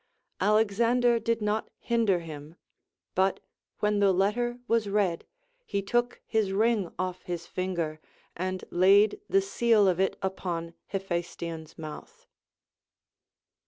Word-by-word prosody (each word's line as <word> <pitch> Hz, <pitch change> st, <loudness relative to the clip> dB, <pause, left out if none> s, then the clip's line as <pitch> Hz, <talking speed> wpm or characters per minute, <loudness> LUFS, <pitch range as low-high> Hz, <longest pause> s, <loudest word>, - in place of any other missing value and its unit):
Alexander 230 Hz, +3 st, +3 dB
did 230 Hz, 0 st, -1 dB
not 210 Hz, +1 st, -1 dB
hinder 225 Hz, -7 st, +1 dB
him; 155 Hz, -1 st, -9 dB, 0.6 s
but 190 Hz, +1 st, +2 dB, 0.4 s
when 210 Hz, 0 st, +2 dB
the 200 Hz, -1 st, +5 dB
letter 220 Hz, +6 st, +1 dB
was 225 Hz, -3 st, +1 dB
read, 195 Hz, -5 st, 0 dB, 0.4 s
he 200 Hz, -, -2 dB
took 240 Hz, +4 st, 0 dB
his 215 Hz, -4 st, 0 dB
ring 215 Hz, -3 st, +2 dB
off" 185 Hz, 0 st, -3 dB
his 175 Hz, -1 st, -5 dB
finger, 170 Hz, -4 st, -3 dB, 0.4 s
and 185 Hz, +1 st, -3 dB
laid 200 Hz, -, +5 dB
the 390 Hz, -, +4 dB
seal 235 Hz, -, +3 dB
of 180 Hz, -1 st, +2 dB
it 190 Hz, -, +1 dB
upon 170 Hz, -3 st, -3 dB, 0.2 s
Ile 195 Hz, -, 0 dB
phaestion's 170 Hz, -3 st, -5 dB
mouth. 155 Hz, -2 st, -9 dB
195 Hz, 125 wpm, -28 LUFS, 175-225 Hz, 0.6 s, the